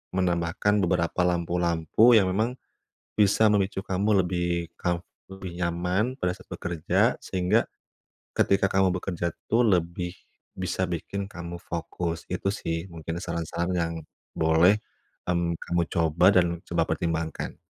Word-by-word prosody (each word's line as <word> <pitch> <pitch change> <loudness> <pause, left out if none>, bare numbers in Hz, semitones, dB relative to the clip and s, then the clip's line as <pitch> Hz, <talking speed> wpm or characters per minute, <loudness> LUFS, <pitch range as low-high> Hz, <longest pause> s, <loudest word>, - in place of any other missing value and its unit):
menambahkan 90 +3 +1
beberapa 85 0 +1
lampu-lampu 85 +5 +3
yang 95 -3 +3
memang 110 +5 0 0.6
bisa 105 +2 +5
memicu 100 -1 +1
kamu 95 0 +2
lebih 85 -1 -1
comf 85 0 -1 0.3
lebih 95 -2 -7
nyaman 90 +8 0
pada 90 - +1
saat - - -17
bekerja. 85 -3 +1
Sehingga, 90 -1 +1 0.7
ketika 100 0 +3
kamu 95 -1 +3
bekerja 85 -2 -2 0.2
tuh 120 +2 +4
lebih 90 -3 0 0.4
bisa 90 0 -1
bikin 95 +4 -3
kamu 85 -3 -7
fokus. 85 0 -4
Itu 90 +2 -1
sih 80 -2 -3
mungkin 80 0 -5
saran-saran 85 +1 -2
yang 85 -1 0 0.4
boleh 80 +5 +5 0.5
hmm 85 -1 0
kamu 85 0 +1
coba 85 +1 +3
dan 85 -1 +2
coba 85 -1 +1
pertimbangkan. 80 -1 -2
90 Hz, 125 wpm, -26 LUFS, 85-95 Hz, 0.7 s, bisa